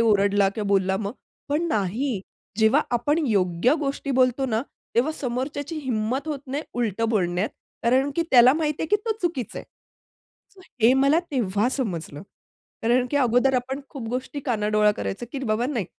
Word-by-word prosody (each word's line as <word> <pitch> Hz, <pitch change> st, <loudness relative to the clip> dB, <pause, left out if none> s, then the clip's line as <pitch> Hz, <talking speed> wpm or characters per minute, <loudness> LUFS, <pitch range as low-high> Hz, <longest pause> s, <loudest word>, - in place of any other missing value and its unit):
ओरडला 205 Hz, -3 st, +3 dB
किंवा 205 Hz, +1 st, -4 dB
बोलला 190 Hz, -1 st, +2 dB
मग? 205 Hz, +1 st, -3 dB, 0.4 s
पण 295 Hz, +4 st, +1 dB
नाही, 215 Hz, -, -1 dB, 0.4 s
जेव्हा 220 Hz, +7 st, +5 dB
आपण 245 Hz, +6 st, +1 dB
योग्य 195 Hz, -, +2 dB
गोष्टी 275 Hz, 0 st, -3 dB
बोलतो 255 Hz, +1 st, +2 dB
ना, 225 Hz, 0 st, 0 dB, 0.3 s
तेव्हा 260 Hz, +7 st, +2 dB
समोरच्याची 285 Hz, +3 st, -4 dB
हिंमत 255 Hz, +2 st, -2 dB
होत 295 Hz, -2 st, -2 dB
नाही 280 Hz, +4 st, -3 dB
उलट 230 Hz, -3 st, -1 dB
बोलण्यात. 185 Hz, -2 st, 0 dB, 0.3 s
कारण, 260 Hz, +4 st, +3 dB
की 335 Hz, -, +3 dB
त्याला 250 Hz, 0 st, +8 dB
माहिती 305 Hz, -2 st, -1 dB
आहे, -, -, -1 dB
की 415 Hz, -, +5 dB
तो 450 Hz, -, +1 dB
चुकीचा 320 Hz, -, -2 dB
आहे. -, -, -10 dB, 1.2 s
हे 235 Hz, +3 st, +7 dB
मला 275 Hz, +4 st, +4 dB
तेव्हा 215 Hz, -4 st, +1 dB
समजलं. 175 Hz, -, -3 dB, 0.6 s
कारण, 245 Hz, +2 st, +3 dB
की 290 Hz, -, +1 dB
अगोदर 255 Hz, 0 st, +3 dB
आपण 260 Hz, +3 st, -1 dB
खूप 250 Hz, -6 st, -7 dB
गोष्टी 255 Hz, +4 st, -4 dB
कानाडोळा 210 Hz, -3 st, +2 dB
करायचं, 240 Hz, +5 st, -4 dB
की 275 Hz, -, -3 dB
बाबा 220 Hz, +2 st, 0 dB
नाही, 245 Hz, -8 st, -2 dB
245 Hz, 160 wpm, -24 LUFS, 215-275 Hz, 1.2 s, त्याला